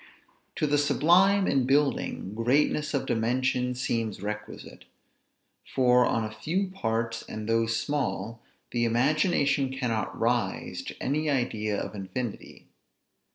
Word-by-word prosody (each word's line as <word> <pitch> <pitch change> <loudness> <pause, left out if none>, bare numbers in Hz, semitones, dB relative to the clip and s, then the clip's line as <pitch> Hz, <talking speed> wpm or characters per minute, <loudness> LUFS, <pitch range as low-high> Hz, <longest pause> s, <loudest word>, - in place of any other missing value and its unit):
To - - 0
the 145 0 +2
sublime 185 +7 +4
in 135 -6 +1
building, 135 -8 0
greatness 145 +6 +1
of 135 - -1
dimension 125 +2 0
seems 115 -5 -2
requisite; 105 +2 -7 0.9
for 125 -1 +5
on 115 - 0
a 110 - -5
few 175 - -2
parts, 115 -8 -2
and 110 0 -6
those 115 0 +1
small, 115 -5 -2 0.3
the 120 -1 0
imagination 140 +3 +2
cannot 125 -5 -2
rise 115 -4 -1
to - - -7
any 150 +3 -1
idea 110 -6 -1
of - - -5
infinity. 105 +4 -6
125 Hz, 120 wpm, -27 LUFS, 115-145 Hz, 0.9 s, for